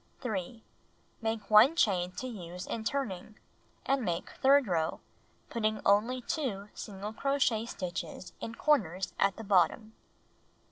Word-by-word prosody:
3. 220 -1 -4 0.6
Make 220 -2 -3
1 225 +9 +8
chain 185 - +2
to 255 - -5
use 180 -7 -7
in 225 - -4
turning, 215 -5 -3 0.5
and 270 -1 +1
make 175 -4 -2
third 275 +1 +4
row, 165 -5 0 0.5
putting 215 -2 0
only 225 +6 +3
2 210 -11 -3
single 205 +1 -6
crochet 250 -4 +1
stitches 180 -2 -5
in 230 - -6
corners 190 - +1
at 195 -1 +3
the 225 - -6
bottom. 210 +3 +2
215 Hz, 130 wpm, -31 LUFS, 190-245 Hz, 0.6 s, 1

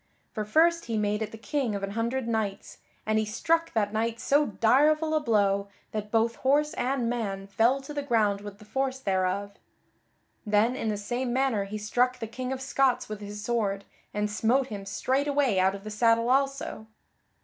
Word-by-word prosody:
For 215 - -3
first 335 +9 +3
he 230 -2 -2
made 210 0 0
at 215 -1 -3
the 225 - -9
King 245 -1 -2
of 200 - -4
an 195 - -2
Hundred 235 +3 -2
Knights, 220 -4 -3 0.3
and 215 0 +2
he - - +1
struck 330 +10 0
that 210 -2 0
knight 225 +1 -1
so 290 +4 +3
direful 300 +9 +3
a 310 - +3
blow 200 -6 +1 0.2
that 210 -1 -4
both 225 +2 +1
horse 290 +3 +2
and 255 -1 -1
man 205 -5 -2
fell 230 +7 +2
to 270 +2 -8
the 290 - -2
ground 215 -7 +1
with 205 -1 -9
the 210 - -15
force 265 +3 -1
thereof. 195 -2 -1 0.9
Then 215 +3 +2
in 225 - -3
the 210 - -1
same 240 +5 -2
manner 250 -5 +1
he 210 +2 -5
struck 245 +4 +1
the 225 - -4
King 255 +3 -5
of 265 0 -3
Scots 265 -3 +1
with 215 -1 -6
his 205 0 -7
sword, 210 -4 -1 0.3
and 210 0 -1
smote 235 +5 +1
him 200 -2 -6
straightway 275 -3 +1
out 190 +1 +3
of 195 - -10
the 215 - -6
saddle 230 +2 +3
also. 270 -4 0
225 Hz, 195 wpm, -27 LUFS, 210-265 Hz, 0.9 s, first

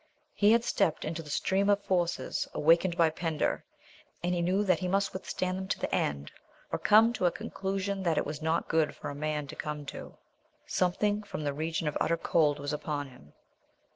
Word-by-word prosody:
He 205 +1 +4
had 230 0 +4
stepped 185 -9 +1
into 160 +1 -3
the 150 - -11
stream 195 +6 +1
of 205 0 +3
forces 175 -2 0
awakened 170 +3 +3
by 165 -2 +4
Pender 160 -1 -1 0.6
and 175 +1 +1
he 175 - 0
knew 185 +4 +2
that 185 -5 +2
he 185 - -2
must 195 +2 +1
withstand 185 0 -3
them 190 - -5
to - - -1
the - - -3
end 70 0 -1 0.4
or - - -1
come 225 +3 +6
to 185 -6 +1
a - - +2
conclusion 195 +2 -3
that 170 -4 +1
it - - +1
was 150 +1 -5
not 160 +1 0
good 155 -3 +1
for - - -6
a - - -6
man 150 0 -2
to 140 - -9
come 150 -1 -5
to. - - -9 0.5
Something 205 +3 +1
from 200 -6 -6
the 145 -1 -1
region 160 +2 -2
of 150 - -1
utter 165 - +2
cold 150 -4 +2
was 145 0 -4
upon 145 -1 -3
him. 75 - -17
170 Hz, 205 wpm, -30 LUFS, 150-190 Hz, 0.6 s, come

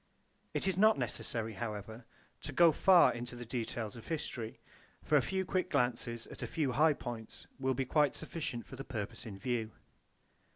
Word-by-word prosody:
It - - 0
is 190 -1 +1
not 215 +1 +6
necessary, 115 -1 -2
however, 110 +2 -5 0.4
to - - -5
go 170 -1 +6
far 180 +3 +6
into 120 +1 -5
the 120 0 -7
details 115 -2 -3
of 115 - -11
history; 130 -8 -4 0.4
for 155 - +2
a 145 - +7
few 190 +6 -1
quick 185 0 0
glances 120 -3 0
at - - -11
a - - -2
few 150 -5 0
high 150 +5 +5
points 115 -5 -7
will 130 -1 +1
be 135 +1 0
quite 145 0 +3
sufficient 155 -7 -3
for 135 - -10
the 135 - -5
purpose 115 -3 -5
in 100 -3 -7
view. 115 +1 -2
125 Hz, 180 wpm, -34 LUFS, 115-155 Hz, 0.4 s, a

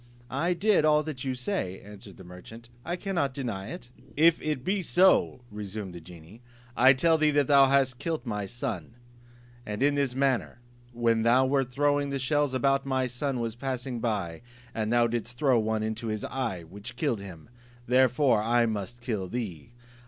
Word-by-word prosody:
"I 170 +7 0
did 205 -2 +3
all 150 0 +4
that 150 -4 -6
you 130 -1 -2
say," 125 - -3
answered 100 -1 -13
the - - -12
merchant, 100 +7 -12
"I 175 - -3
cannot 175 -8 -2
deny 110 -8 -4
it." 120 +2 -9 0.3
"If 165 +2 +5
it 150 -4 -2
be 195 +4 0
so," 180 -6 +3
resumed 105 -2 -6
the 85 - -9
genie, 85 +6 -14 0.3
"I 130 +2 +7
tell 160 +4 +2
thee 155 0 +4
that 145 -1 +2
thou 140 0 +6
hast 135 -2 +2
killed 160 -6 -3
my 105 -4 -3
son; 115 -4 -5 0.7
and 105 +3 -3
in 145 +1 +4
this 140 -3 0
manner: 135 -3 0 0.3
When 115 -1 +1
thou 120 +3 +4
wert 135 -1 +1
throwing 145 +1 +1
the 140 - -2
shells 145 +1 0
about, 135 +1 +2
my 130 -1 0
son 125 +1 -3
was 115 -1 -3
passing 130 -1 -4
by, 100 -8 -2 0.3
and 110 0 -2
thou 120 0 +4
didst 120 +1 -3
throw 130 -3 +3
one 110 0 -1
into 110 +1 -3
his 110 -1 -3
eye, 115 -10 -3
which 100 +8 -10
killed 120 -3 -1
him; 90 -5 -10 0.4
therefore 125 -1 +3
I 120 +2 +2
must 110 +2 -4
kill 110 -6 -3
thee." 100 -3 -5
125 Hz, 180 wpm, -27 LUFS, 110-140 Hz, 0.7 s, I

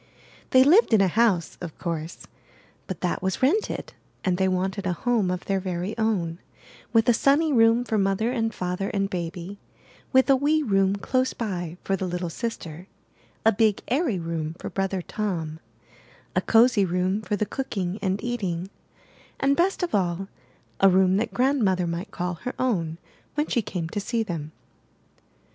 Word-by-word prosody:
They 260 0 +7
lived 320 - +5
in 205 - +4
a 195 - +4
house, 195 -4 +1
of 170 -4 -7
course, 165 -1 -5 0.6
but 185 - -5
that 180 - -1
was 190 +6 -2
rented; 375 +12 0 0.3
and 180 -2 +2
they 190 - +3
wanted 190 +1 -1
a 180 - +1
home 225 0 +1
of 180 0 -3
their 195 -1 0
very 185 +2 -3
own, 190 -7 -1 0.5
with 225 -1 +3
a 240 - +6
sunny 285 +6 +3
room 230 0 +5
for 220 -3 0
Mother 195 +4 +1
and 225 -3 0
Father 180 -1 -3
and 195 -1 -1
Baby, 175 +2 -5 0.5
with 260 -1 +5
a 275 - +6
wee 300 +3 +2
room 195 -4 +2
close 255 +6 0
by 180 -6 -4
for 195 - 0
the 190 0 -3
little 175 -1 -3
sister; 180 -6 -5 0.6
a 225 - +7
big, 215 -1 +2
airy 265 - +1
room 165 -2 -3
for - - -7
Brother 195 -1 -1
Tom; 165 -8 -3 0.8
a 185 - +3
cosy 230 0 +4
room 185 +3 0
for 210 0 -2
the 210 - 0
cooking 205 -7 -3
and 195 +1 -1
eating; 195 -7 -3 0.7
and, 275 +1 +3
best 365 +4 +1
of 350 - -2
all, 190 0 0 0.5
a 195 - +7
room 190 0 +4
that 225 - -1
Grandmother 235 -9 +2
might 170 +4 -4
call 180 -2 -3
her 250 - -4
own 170 -11 0 0.4
when 295 +1 +1
she 245 - 0
came 180 -5 -4
to 205 - -3
see 225 +3 -1
them. 160 -7 -5
195 Hz, 170 wpm, -25 LUFS, 180-230 Hz, 0.8 s, They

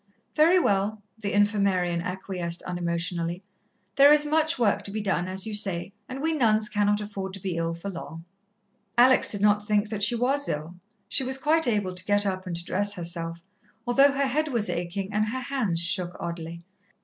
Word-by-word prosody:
"Very 325 +4 +5
well," 205 - 0 0.2
the 205 -2 -3
Infirmarian 200 -4 +1
acquiesced 180 -1 -3
unemotionally. 175 0 -3 0.5
"There 280 +1 +8
is 300 0 +5
much 315 +1 +1
work 205 -4 +2
to 200 - -4
be 215 - -3
done, 190 -4 -1
as 190 +1 0
you 220 - -4
say, 195 -3 -1 0.2
and 265 +2 -6
we 325 0 +1
nuns 220 -6 +2
cannot 205 -1 +1
afford 195 -2 -5
to - - -9
be 185 -2 -3
ill 165 0 -2
for 195 +4 -6
long." 165 -2 -9 0.7
Alex 255 +2 +6
did 205 - 0
not 210 0 +3
think 210 0 +1
that 215 -2 -4
she 240 - +4
was 270 +4 0
ill 155 +3 -4 0.3
she 270 - -1
was 260 +1 -2
quite 310 +2 +2
able 205 -5 0
to 180 +1 -4
get 205 0 +2
up 185 -1 -3
and 175 - -3
to 170 +1 -4
dress 205 +3 -1
herself, 170 -2 -5 0.4
although 275 +3 +4
her 280 0 +1
head 300 +4 0
was 235 -7 -1
aching 190 +4 -4
and 215 +1 +1
her 260 +4 -3
hands 245 -10 -1
shook 175 +1 0
oddly. 170 0 -6
205 Hz, 195 wpm, -26 LUFS, 175-240 Hz, 0.7 s, There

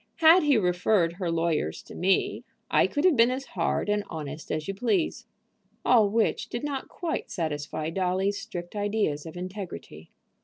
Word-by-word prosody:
Had 330 +3 +7
he 290 -4 +4
referred 180 -2 +2
her 175 -1 -3
lawyers 165 - -1
to - - -12
me 190 +1 +1 0.3
I - - +4
could 290 +3 -1
have 360 -5 +5
been 230 0 +5
as 260 +2 -3
hard 170 +2 0
and 210 0 +1
honest 155 -2 -6
as 155 0 -2
you 195 - -2
please." 245 - -1 0.6
All 220 -5 +5
which 225 +2 0
did 240 - -4
not 280 -2 -3
quite 335 -3 -4
satisfy 155 -2 -3
Dolly's 190 +3 0
strict 175 +2 -7
ideas 205 -8 -1
of 160 - -9
integrity. 180 - -7
190 Hz, 165 wpm, -27 LUFS, 165-230 Hz, 0.6 s, Had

